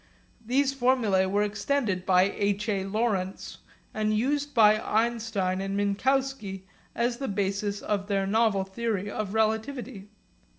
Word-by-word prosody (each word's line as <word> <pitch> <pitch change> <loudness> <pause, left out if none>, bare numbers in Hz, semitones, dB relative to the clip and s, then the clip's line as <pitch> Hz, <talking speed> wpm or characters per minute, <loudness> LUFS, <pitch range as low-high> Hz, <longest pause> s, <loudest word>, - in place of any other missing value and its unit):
These 265 +4 +1
formulae 240 -8 +2
were 205 +2 +1
extended 210 -2 -1
by 185 -1 +5
H. 200 +2 -1
A. 200 -3 0
Lorentz, 195 -2 -2 0.3
and 215 0 0
used 285 +5 0
by 215 -2 +6
Einstein 220 -4 0
and 195 0 -3
Minkowski 205 -1 -1 0.3
as 235 0 0
the 270 - -3
basis 200 0 -2
of 200 -1 -2
their 195 -2 0
novel 210 -1 +2
theory 205 0 -3
of 210 -1 -4
relativity. 220 0 -1
210 Hz, 130 wpm, -27 LUFS, 195-235 Hz, 0.3 s, by